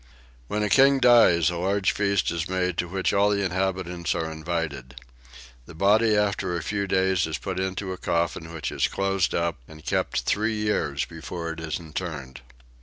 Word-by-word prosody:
When 105 +8 -1
a 105 - 0
king 140 0 +6
dies 120 -10 +5
a 85 - -4
large 95 +2 +1
feast 100 -2 +1
is 85 +1 -3
made 90 -1 0
to 90 - 0
which 95 +2 -1
all 100 +1 +4
the 100 -1 +1
inhabitants 95 -1 -1
are 80 -1 -2
invited. 80 -6 -4 0.7
The 85 - -11
body 105 +4 +4
after 100 -4 0
a 85 - -5
few 100 -1 -2
days 95 -2 +2
is 80 - -3
put 95 -2 -4
into 95 0 -3
a - - -7
coffin 85 -1 -1
which 80 -2 -4
is - - +1
closed 95 -1 0
up 85 -1 0
and 80 -1 -14
kept - - 0
three 110 +2 0
years 105 -10 -1
before 85 0 -6
it 80 - -7
is 80 0 -3
interred. 75 -5 -6
90 Hz, 180 wpm, -25 LUFS, 80-100 Hz, 0.7 s, king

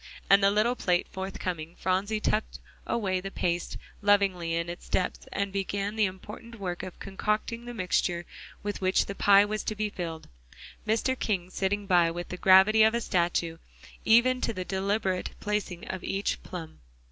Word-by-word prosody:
And 200 0 +7
the 195 - +5
little 215 +4 +2
plate 180 -6 +1
forthcoming, 180 -3 -5
Phronsie 195 +4 0
tucked 215 0 -1 0.3
away 190 -5 0
the 195 - -5
paste 175 -2 -2 0.2
lovingly 195 -5 +2
in 170 0 -1
its 175 0 -8
depths, 180 - -1
and 200 -1 -2
began 200 +1 -2
the 215 -1 +3
important 210 +5 -10
work 180 -3 -3
of 185 -2 -8
concocting 210 +4 -2
the 240 - -6
mixture 180 -3 0 0.4
with 205 -1 -4
which 185 0 +2
the 200 - -5
pie 200 0 +6
was 215 +1 -3
to 215 - -2
be 210 0 -2
filled, 165 -4 -6 0.6
Mr. 225 +4 +2
King 185 -4 -1
sitting 200 +2 -1
by 175 -3 +4
with 175 +1 -5
the 180 - -5
gravity 190 +4 +6
of 220 +1 +5
a - - +1
statue, 170 -4 0 0.4
even 250 +3 +4
to 230 - 0
the 185 -3 -4
deliberate 190 -1 -1
placing 205 -4 -3
of 190 -1 -5
each 195 +1 -1
plum. 165 -3 -8
195 Hz, 170 wpm, -28 LUFS, 180-210 Hz, 0.6 s, And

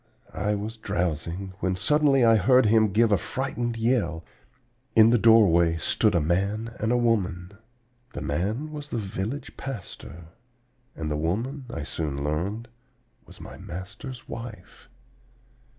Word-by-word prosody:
I 105 0 0
was 110 +3 -5
drowsing, 90 0 -3
when 95 -1 0
suddenly 140 +4 +3
I 115 -1 +6
heard 125 +5 +5
him 110 -1 +4
give 115 +3 +3
a 100 - +4
frightened 120 -1 -3
yell. 110 -9 0 0.7
In 110 0 +7
the 120 - +4
doorway 85 -8 +5
stood 100 +5 +1
a - - +4
man 100 +8 -1
and 110 +2 0
a 125 - +3
woman. 95 -7 0 0.6
The - - -5
man 105 - -2
was 145 -1 -7
the - - -3
village 105 +5 -4
pastor, 90 -9 -8 0.7
and 75 -1 -4
the 75 - 0
woman, 115 - -2
I 80 - -5
soon 70 -2 -4
learned, 95 +10 -2 0.6
was - - -14
my - - -10
master's 100 +8 -8
wife. 115 -5 -9
105 Hz, 140 wpm, -26 LUFS, 85-120 Hz, 0.7 s, In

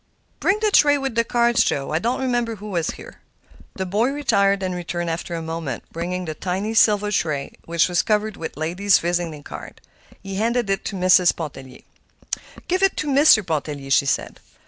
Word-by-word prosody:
"Bring 400 +2 +2
the 430 -1 +2
tray 290 -6 +5
with 270 -3 -3
the 230 0 +2
cards, 235 0 +2
Joe. 135 +1 -2
I 155 - +1
don't 240 +7 -1
remember 240 -3 0
who 210 0 -9
was 170 -3 -1
here." - - -9 0.6
The 190 - -3
boy 210 +7 +1
retired 200 -9 +1
and 185 -1 -2
returned 175 -1 -3
after 170 +1 -4
a 165 - -4
moment, 160 -6 -4
bringing 180 +2 -3
the 155 - -4
tiny 190 +7 -3
silver 210 -2 +3
tray, 155 -8 -1
which 170 -1 +2
was 175 -1 +2
covered 215 0 0
with 160 - -7
ladies' 180 +6 +2
visiting 170 -3 -2
cards. - - -9 0.5
He 195 -1 -5
handed 230 0 0
it 195 - -1
to 200 - -4
Mrs. 185 -1 +4
Pontellier. 135 -5 -8 0.9
"Give 370 +2 0
it 390 -1 +2
to 305 - -2
Mr. 275 -7 +5
Pontellier," 145 -4 -3
she 140 +1 +4
said. - - -2
190 Hz, 190 wpm, -22 LUFS, 165-230 Hz, 0.9 s, tray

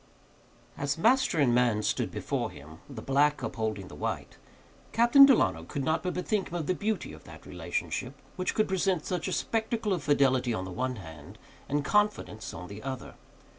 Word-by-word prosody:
As 145 +1 -1
master 230 0 +3
and 135 -5 +4
man 120 -3 +2
stood - - 0
before - - -2
him, 80 +3 -12
the 120 -6 -8
black 145 +2 +2
upholding 110 -4 -3
the - - -12
white, - - -4 0.6
Captain 240 +5 +8
Delano 80 - +3
could 135 +11 -4
not 160 +4 +1
but 180 - -3
bethink 195 +2 -1
him 175 - -6
of 165 -3 -2
the 185 - +1
beauty 215 +3 -2
of - - -13
that - - -13
relationship 480 - -4 0.2
which 185 -1 -2
could 215 - +2
present 190 -3 0
such 180 -3 -2
a - - -2
spectacle 225 -2 -1
of 175 - -2
fidelity 130 -4 +2
on 95 - -3
the 95 - -7
one 130 +5 -2
hand 80 -8 -11 0.3
and 145 0 0
confidence 205 - 0
on 90 +2 -8
the 100 +2 -9
other. 130 0 -6
145 Hz, 185 wpm, -29 LUFS, -, 0.6 s, Captain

